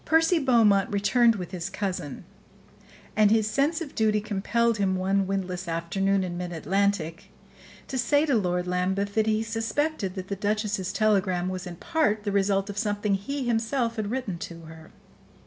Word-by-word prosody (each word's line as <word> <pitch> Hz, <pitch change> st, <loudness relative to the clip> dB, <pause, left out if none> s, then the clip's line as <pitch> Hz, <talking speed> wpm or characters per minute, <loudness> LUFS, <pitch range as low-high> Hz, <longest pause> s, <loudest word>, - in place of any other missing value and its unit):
Percy 325 Hz, +2 st, +3 dB
Beaumont 225 Hz, -8 st, +4 dB
returned 230 Hz, +3 st, +3 dB
with 180 Hz, -4 st, -6 dB
his 180 Hz, 0 st, -4 dB
cousin, 180 Hz, -8 st, -4 dB, 0.9 s
and 215 Hz, -1 st, +5 dB
his 220 Hz, 0 st, +3 dB
sense 285 Hz, +9 st, +1 dB
of 300 Hz, -4 st, -6 dB
duty 215 Hz, -2 st, +2 dB
compelled 215 Hz, +2 st, 0 dB
him, 190 Hz, -2 st, +1 dB
one 190 Hz, +1 st, +1 dB
windless 190 Hz, -2 st, -3 dB
afternoon, 190 Hz, +4 st, 0 dB
in 175 Hz, -1 st, -4 dB
mid 180 Hz, -1 st, -4 dB
Atlantic, 190 Hz, -1 st, -1 dB, 0.6 s
to 260 Hz, -, -3 dB
say 285 Hz, +5 st, +3 dB
to 290 Hz, -, +1 dB
Lord 180 Hz, -5 st, +1 dB
Lambeth 190 Hz, +3 st, -1 dB
that 220 Hz, 0 st, +1 dB
he 220 Hz, 0 st, +1 dB
suspected 225 Hz, -1 st, -2 dB
that 185 Hz, -1 st, -6 dB
the 200 Hz, -, -3 dB
duchess's 205 Hz, -1 st, -1 dB
telegram 190 Hz, -4 st, +1 dB
was 185 Hz, 0 st, -5 dB
in 175 Hz, -, -7 dB
part 215 Hz, -, 0 dB
the 205 Hz, -, -1 dB
result 195 Hz, 0 st, +1 dB
of 205 Hz, 0 st, -4 dB
something 205 Hz, -2 st, 0 dB
he 270 Hz, +9 st, -2 dB
himself 230 Hz, +1 st, 0 dB
had 210 Hz, -2 st, -2 dB
written 220 Hz, -8 st, -3 dB
to 165 Hz, 0 st, -7 dB
her. 160 Hz, 0 st, -12 dB
200 Hz, 170 wpm, -26 LUFS, 185-225 Hz, 0.9 s, and